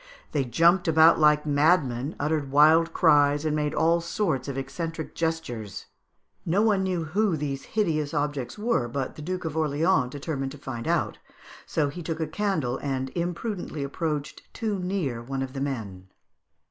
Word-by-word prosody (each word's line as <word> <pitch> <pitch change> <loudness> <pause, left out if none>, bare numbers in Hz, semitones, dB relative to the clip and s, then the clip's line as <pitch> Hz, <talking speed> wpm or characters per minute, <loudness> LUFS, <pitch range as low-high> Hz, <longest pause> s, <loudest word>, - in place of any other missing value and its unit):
They 140 -3 0
jumped 170 +9 +3
about 160 +1 +6
like 150 -1 +4
madmen, 145 -3 +2
uttered 150 -1 -1
wild 155 +4 +5
cries, 145 -1 +4
and 155 -1 +1
made 150 -1 -1
all 170 +1 +3
sorts 165 - -1
of 135 -1 -4
eccentric 160 +4 -5
gestures. 160 - -3 0.6
No 185 +5 +2
one 210 -3 +3
knew 185 -3 -1
who 185 +2 0
these 140 -2 -4
hideous 155 -8 +1
objects 145 -5 -2
were, 210 - 0
but 130 +2 -4
the - - -9
Duke 180 +3 -4
of 160 -1 -3
Orleans 155 -2 +2
determined 135 -1 -4
to - - -10
find 130 -5 -6
out, - - 0 0.5
so 150 -3 0
he 175 +5 -7
took 160 0 -4
a 160 - 0
candle 155 -7 -1
and 130 -2 -2
imprudently 175 -2 -3
approached 150 +1 -3
too 215 -4 -2
near 180 -10 -2
one 135 +2 -3
of 130 -1 -7
the 135 - -4
men. 105 -9 -4
150 Hz, 165 wpm, -26 LUFS, 135-170 Hz, 0.6 s, about